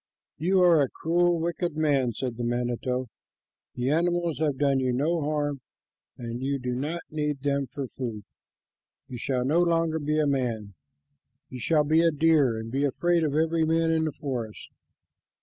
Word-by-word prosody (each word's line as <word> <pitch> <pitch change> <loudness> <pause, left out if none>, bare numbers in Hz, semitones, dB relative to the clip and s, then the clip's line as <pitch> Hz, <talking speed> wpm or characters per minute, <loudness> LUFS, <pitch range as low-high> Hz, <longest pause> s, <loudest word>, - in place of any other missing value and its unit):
"You 185 +4 +3
are 170 -4 +6
a 135 - +1
cruel, 175 +1 +1
wicked 170 -1 -2
man," 140 -6 +2
said 120 +1 -4
the 120 - -3
manito. 125 +1 -1 0.7
"The 125 +3 0
animals 170 0 0
have 150 -4 0
done 140 -1 +2
you 130 -1 0
no 155 +7 0
harm, 145 -2 -1 0.6
and 120 0 -6
you 140 +1 -1
do 125 -1 -3
not 150 +7 -3
need 150 -2 -2
them 140 -1 0
for 140 +3 -5
food. 115 -5 -6 0.8
You 125 - -7
shall 125 0 -1
no 155 +6 +2
longer 165 -2 +1
be 150 +1 -1
a 155 - +3
man. 120 -7 -1 0.8
You 125 - -8
shall 150 +5 +2
be 155 +3 +3
a 170 - +4
deer, 150 -6 +3
and 110 +1 -6
be 135 +3 0
afraid 170 +4 +1
of 150 -2 0
every 160 +1 +2
man 165 +1 +2
in 160 -1 +1
the 155 - -1
forest." 125 -7 -5
145 Hz, 175 wpm, -26 LUFS, 125-160 Hz, 0.8 s, are